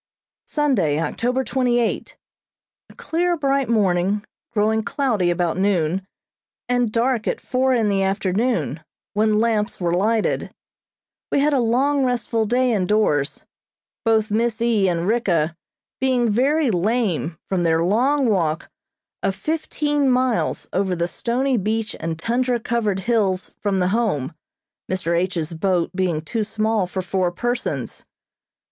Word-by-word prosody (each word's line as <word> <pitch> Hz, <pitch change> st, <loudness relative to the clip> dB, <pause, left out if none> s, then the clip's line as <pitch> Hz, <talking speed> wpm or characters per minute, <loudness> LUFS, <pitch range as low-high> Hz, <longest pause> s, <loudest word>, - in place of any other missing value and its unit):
Sunday, 215 Hz, -, +1 dB
October 245 Hz, -, -1 dB
twenty 250 Hz, -2 st, +1 dB
eight: 235 Hz, -, -2 dB, 0.7 s
A -, -, -16 dB
clear, 345 Hz, +1 st, 0 dB
bright 275 Hz, -3 st, +1 dB
morning, 200 Hz, -2 st, +1 dB, 0.3 s
growing 220 Hz, 0 st, +2 dB
cloudy 220 Hz, -, 0 dB
about 175 Hz, -1 st, 0 dB
noon, 190 Hz, -1 st, +1 dB, 0.6 s
and 245 Hz, -2 st, +1 dB
dark 235 Hz, 0 st, 0 dB
at -, -, -1 dB
four 260 Hz, 0 st, +1 dB
in 225 Hz, -3 st, +2 dB
the 200 Hz, -1 st, +1 dB
afternoon, 195 Hz, +5 st, 0 dB, 0.3 s
when 215 Hz, 0 st, +2 dB
lamps 220 Hz, -1 st, 0 dB
were 170 Hz, -2 st, 0 dB
lighted. 215 Hz, +5 st, +1 dB, 0.8 s
We -, -, +2 dB
had 295 Hz, +1 st, +2 dB
a 275 Hz, -, +3 dB
long, 265 Hz, +4 st, +2 dB
restful 240 Hz, -3 st, 0 dB
day 250 Hz, +2 st, +2 dB
indoors, 185 Hz, -8 st, +1 dB, 0.6 s
both 220 Hz, -2 st, +2 dB
Miss 230 Hz, +1 st, 0 dB
E. 225 Hz, -4 st, +2 dB
and 170 Hz, -1 st, -1 dB
Ricka 175 Hz, -8 st, +1 dB, 0.4 s
being 250 Hz, -3 st, +2 dB
very 275 Hz, +4 st, +2 dB
lame 185 Hz, -4 st, 0 dB
from 190 Hz, -2 st, 0 dB
their 165 Hz, -1 st, +2 dB
long 255 Hz, +9 st, +2 dB
walk 170 Hz, -7 st, 0 dB, 0.5 s
of 195 Hz, -, 0 dB
fifteen 295 Hz, -2 st, 0 dB
miles 255 Hz, -2 st, +1 dB
over 190 Hz, -1 st, 0 dB
the 170 Hz, 0 st, -1 dB
stony 250 Hz, +7 st, 0 dB
beach 215 Hz, +2 st, -1 dB
and 165 Hz, -1 st, -3 dB
tundra 240 Hz, +6 st, 0 dB
covered 215 Hz, -4 st, -1 dB
hills 195 Hz, -4 st, 0 dB
from 200 Hz, -2 st, 0 dB
the 180 Hz, -1 st, +1 dB
Home, 195 Hz, -, 0 dB, 0.6 s
Mr. 175 Hz, -2 st, 0 dB
H.'s 170 Hz, -2 st, -1 dB
boat 175 Hz, 0 st, 0 dB
being 180 Hz, -5 st, 0 dB
too 225 Hz, +6 st, -2 dB
small 215 Hz, -2 st, 0 dB
for 185 Hz, +1 st, -4 dB
four 180 Hz, 0 st, 0 dB
persons. 240 Hz, +7 st, -3 dB
215 Hz, 135 wpm, -22 LUFS, 185-245 Hz, 0.8 s, a